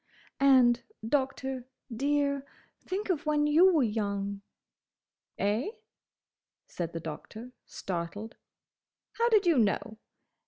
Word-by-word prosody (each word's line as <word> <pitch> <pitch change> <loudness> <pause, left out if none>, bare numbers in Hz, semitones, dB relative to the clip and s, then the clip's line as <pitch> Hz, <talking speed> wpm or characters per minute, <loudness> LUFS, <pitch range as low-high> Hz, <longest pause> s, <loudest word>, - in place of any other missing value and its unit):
"And, 255 -3 +5 0.3
Doctor, 265 -1 -1 0.3
dear—think 285 - -2
of 320 -2 -3
when 295 -1 +2
you 330 +6 +6
were 315 -6 +3
young!" 200 -2 -2 1.0
"Eh?" 210 - 0 1.0
said 170 -2 -5
the 165 - -3
Doctor, 190 +10 -8 0.2
startled. 190 +5 -5 0.8
"How 470 +1 +4
did 425 -4 +4
you 335 -7 +4
know? 220 0 0
255 Hz, 95 wpm, -29 LUFS, 205-295 Hz, 1.0 s, you